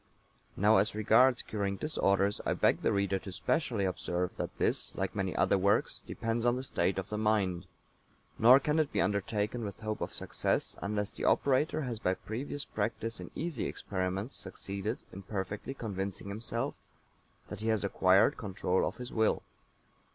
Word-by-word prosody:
Now, 105 Hz, +3 st, +5 dB
as 100 Hz, +2 st, +2 dB
regards 125 Hz, +4 st, +4 dB
curing 100 Hz, -2 st, -2 dB
disorders, 100 Hz, -9 st, +1 dB
I -, -, +1 dB
beg -, -, +3 dB
the -, -, +2 dB
reader 100 Hz, -1 st, +1 dB
to 95 Hz, -, -8 dB
specially 110 Hz, -, 0 dB
observe 90 Hz, -1 st, -2 dB
that -, -, -4 dB
this, -, -, 0 dB
like -, -, -2 dB
many -, -, -2 dB
other 100 Hz, -, +3 dB
works, 100 Hz, +2 st, +2 dB
depends 115 Hz, 0 st, -2 dB
on 120 Hz, 0 st, +3 dB
the 130 Hz, -, -3 dB
state 95 Hz, -7 st, 0 dB
of 95 Hz, +1 st, -3 dB
the 105 Hz, -, -2 dB
mind; 100 Hz, -4 st, +1 dB, 0.7 s
nor 125 Hz, +4 st, +8 dB
can 150 Hz, +3 st, +1 dB
it 155 Hz, -3 st, +1 dB
be -, -, -1 dB
undertaken 105 Hz, +4 st, 0 dB
with 100 Hz, +1 st, -6 dB
hope 110 Hz, -1 st, -3 dB
of -, -, -2 dB
success -, -, -1 dB
unless 105 Hz, 0 st, -1 dB
the -, -, -5 dB
operator 145 Hz, +3 st, +2 dB
has 120 Hz, -6 st, -3 dB
by 95 Hz, -3 st, +1 dB
previous 135 Hz, +7 st, -5 dB
practice 115 Hz, +2 st, -3 dB
in -, -, -7 dB
easy 165 Hz, -9 st, -2 dB
experiments 95 Hz, +4 st, -3 dB
succeeded 100 Hz, +3 st, -3 dB, 0.2 s
in 95 Hz, -, -7 dB
perfectly 100 Hz, +6 st, -4 dB
convincing 100 Hz, -4 st, -4 dB
himself 115 Hz, +5 st, -2 dB, 0.8 s
that -, -, -6 dB
he 110 Hz, -, -3 dB
has 110 Hz, -2 st, +2 dB
acquired 95 Hz, 0 st, +4 dB
control 95 Hz, -3 st, 0 dB
of -, -, -5 dB
his 125 Hz, 0 st, -7 dB
will. 110 Hz, -1 st, +2 dB
105 Hz, 170 wpm, -31 LUFS, 100-115 Hz, 0.8 s, nor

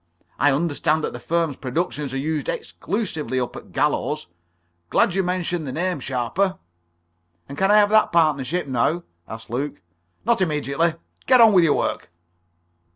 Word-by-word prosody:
I 145 Hz, -, +4 dB
understand 155 Hz, +1 st, 0 dB
that -, -, -2 dB
the -, -, -7 dB
firm's 165 Hz, -4 st, -1 dB
productions 145 Hz, +1 st, -3 dB
are 135 Hz, -, -3 dB
used 150 Hz, +1 st, -2 dB
exclusively 160 Hz, -, -3 dB
up 125 Hz, -, -3 dB
at -, -, -11 dB
Gallows. 150 Hz, +2 st, 0 dB, 0.6 s
Glad 180 Hz, -, +3 dB
you 195 Hz, -, +2 dB
mentioned 175 Hz, -3 st, -2 dB
the -, -, -3 dB
name, 175 Hz, +2 st, -1 dB
Sharper." 130 Hz, +10 st, -1 dB, 0.9 s
"And 140 Hz, -, -8 dB
can 195 Hz, +5 st, +1 dB
I 210 Hz, -, +6 dB
have 205 Hz, 0 st, +4 dB
that 215 Hz, 0 st, +4 dB
partnership 155 Hz, 0 st, +1 dB
now?" 140 Hz, +6 st, 0 dB, 0.2 s
asked 110 Hz, +1 st, -9 dB
Luke. 140 Hz, +4 st, -3 dB, 0.5 s
"Not 235 Hz, -2 st, +2 dB
immediately. 155 Hz, 0 st, 0 dB, 0.3 s
Get 255 Hz, -1 st, +6 dB
on 225 Hz, -2 st, +8 dB
with 180 Hz, -3 st, +6 dB
your 150 Hz, -, +3 dB
work." -, -, -2 dB
155 Hz, 155 wpm, -22 LUFS, 140-180 Hz, 0.9 s, on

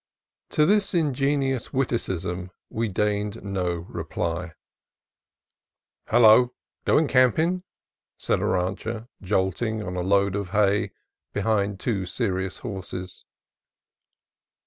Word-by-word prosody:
To 150 Hz, -, +3 dB
this 200 Hz, +1 st, +2 dB
ingenious 140 Hz, -4 st, +1 dB
witticism 95 Hz, -8 st, -2 dB, 0.2 s
we 115 Hz, +1 st, -1 dB
deigned 105 Hz, +1 st, -1 dB
no 90 Hz, -4 st, -2 dB
reply. 85 Hz, +1 st, -3 dB, 1.5 s
"Hello! 120 Hz, +2 st, +6 dB
— -, -, -54 dB
goin' 160 Hz, -, +4 dB
campin'?" 155 Hz, +8 st, +3 dB, 0.6 s
said -, -, 0 dB
a -, -, -1 dB
rancher, 105 Hz, +6 st, -2 dB
jolting 105 Hz, +3 st, 0 dB
on 90 Hz, -2 st, -5 dB
a 90 Hz, -, -1 dB
load 100 Hz, +1 st, +2 dB
of 100 Hz, -2 st, -3 dB
hay 100 Hz, +1 st, +2 dB, 0.5 s
behind 100 Hz, -2 st, +1 dB
two 100 Hz, -6 st, -1 dB
serious 95 Hz, -3 st, -2 dB
horses. 95 Hz, -3 st, -6 dB
105 Hz, 100 wpm, -25 LUFS, 95-120 Hz, 1.5 s, Hello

